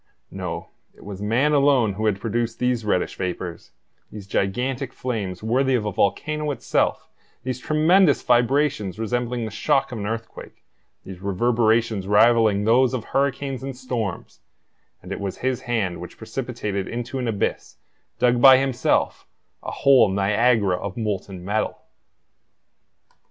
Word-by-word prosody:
No, 85 -3 -5 0.3
it - - -17
was 100 -1 -7
man 120 +8 +2
alone 135 -7 +3
who 110 +3 -1
had 100 -2 0
produced 115 +1 -2
these 125 -2 0
reddish 100 -4 -1
vapors, 90 -2 -5 0.4
these 105 -2 -9
gigantic 125 +8 -2
flames 105 -7 -4
worthy 130 +4 +2
of 110 -4 -1
a 105 - -1
volcano 150 +11 0
itself, 145 - -1 0.4
these 130 -1 -3
tremendous 155 +3 +3
vibrations 120 - +1
resembling 120 +1 -2
the 110 - -6
shock 125 +5 +1
of 120 - -5
an 100 - -3
earthquake, 115 +1 -7 0.4
these 95 -2 -9
reverberations 110 0 +1
rivaling 110 -1 +4
those 125 +4 +3
of 120 - -4
hurricanes 135 0 -1
and 135 -1 -6
storms; 120 -7 -4 0.6
and 90 - -10
it - - -4
was 100 -2 -4
his 130 -1 -2
hand 105 -7 -1
which - - -10
precipitated 100 -2 -4
into 120 +2 -4
an 125 - -2
abyss, 105 -3 -2 0.4
dug 120 0 +2
by 135 -1 +9
himself, 135 -2 0 0.3
a - - -6
whole 135 -6 +4
Niagara 100 0 +2
of 90 +2 -6
molten 100 -4 -4
metal! 105 +3 -1
115 Hz, 140 wpm, -23 LUFS, 100-130 Hz, 0.6 s, by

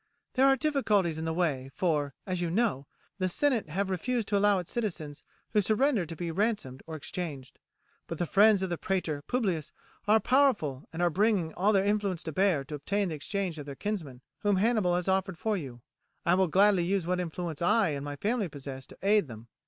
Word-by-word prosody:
"There 265 +1 +4
are 270 - +6
difficulties 215 - +1
in 160 - -3
the 160 - -1
way, 145 -7 -1
for, 150 -6 0
as 185 -2 -2
you 175 - -1
know, 175 - 0 0.3
the 185 0 +1
senate 245 - +1
have 190 +4 -1
refused 230 +5 -1
to 205 - +1
allow 205 0 +4
its 180 -2 -5
citizens 170 -11 -4 0.3
who 210 - +3
surrender 215 - +2
to 165 - -7
be 170 +1 -4
ransomed 190 - -1
or 160 - -6
exchanged; 150 -4 -6 0.5
but 165 - -5
the 175 - 0
friends 200 +2 +5
of 185 - -2
the 175 - -2
praetor 170 -6 -1
Publius 190 - -1 0.4
are 215 +1 +6
powerful 225 - +2
and 165 +2 -2
are 175 - +3
bringing 195 -3 +1
all 200 +4 +2
their 195 -2 +3
influence 200 -4 0
to 160 - -4
bear 180 -3 +2
to 135 - -10
obtain 195 +7 -1
the 160 - -3
exchange 175 +1 -3
of 145 - -8
their 140 - -6
kinsman, 155 -10 -4 0.2
whom 205 -1 +2
Hannibal 205 -3 +2
has 180 +1 -1
offered 190 -2 0
for 220 +2 0
you. 130 -9 -7 0.4
I 170 - +4
will 190 0 +3
gladly 190 +2 +4
use 190 0 0
what 180 +1 0
influence 170 -2 -4
I 210 +2 +3
and 140 -2 -3
my 145 0 -5
family 210 - -1
possess 135 -2 -8
to - - -14
aid 205 -3 +3
them. 115 -1 -11
180 Hz, 210 wpm, -29 LUFS, 155-205 Hz, 0.5 s, are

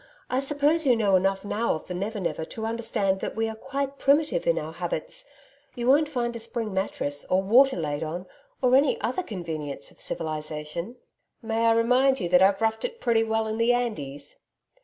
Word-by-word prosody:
I 255 - +2
suppose 290 +3 +1
you 250 - +6
know 205 -4 +3
enough 195 +1 +1
now 215 +1 0
of 155 - -8
the 180 - -4
Never 205 +4 -3
Never 170 -3 -2
to 220 +7 -6
understand 225 -4 0
that - - -4
we 225 0 0
are 220 - -4
quite 275 +4 -4
primitive 310 - +2
in - - +3
our - - -3
habits. - - -4 0.5
You 240 -1 -3
won't 290 +3 +4
find 240 -4 -2
a - - -4
spring 225 -2 -4
mattress 145 -7 -2
or 185 +1 +1
water 255 +6 +5
laid 150 -3 -2
on 165 +3 -4 0.4
or 255 0 +5
any 275 +1 +3
other 240 - -1
convenience 165 - -5
of - - -18
civilisation.' 155 +5 -4 0.5
'May 225 +1 +1
I 225 - +5
remind 250 +4 +3
you 180 - -1
that 180 +1 +5
I've 195 +1 +4
roughed 220 0 0
it 470 -1 -4
pretty 230 - +2
well 220 0 0
in 220 +1 -3
the 235 +1 +4
Andes.' 145 - -4
225 Hz, 200 wpm, -26 LUFS, 185-255 Hz, 0.5 s, you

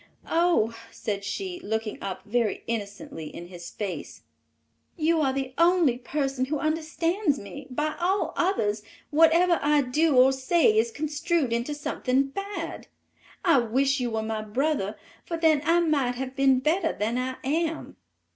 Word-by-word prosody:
"Oh," 330 -10 +2
said 205 -3 -4
she, 360 - -4
looking 220 -3 -3
up 195 -2 -5
very 225 0 0
innocently 205 -7 -5
in 175 +3 -9
his 175 -2 -9
face, 200 -4 -6 0.7
"you 325 0 +2
are 270 -3 +2
the 265 -1 -3
only 335 -8 +4
person 270 0 -1
who 300 +3 -2
understands 320 +2 0
me; 265 +6 -9
by 300 +4 -2
all 375 +3 0
others, 220 - 0 0.3
whatever 330 +3 +5
I 295 0 +3
do 295 +4 +2
or 255 +1 +7
say 335 - +3
is 445 +2 +3
construed 310 - -1
into 240 +6 -1
something 275 -2 0
bad. 395 +7 -5 0.6
I 330 -7 +6
wish 265 +4 +1
you 245 -1 -1
were 220 -1 -2
my 220 0 -2
brother, 220 -1 -1 0.3
for 335 - -4
then 320 -3 +3
I 340 +1 +4
might 280 -7 +1
have 260 +1 -5
been 270 -2 +3
better 325 +8 +1
than 225 +4 -1
I 255 +1 -2
am." 320 +4 -2
275 Hz, 155 wpm, -26 LUFS, 235-330 Hz, 0.7 s, or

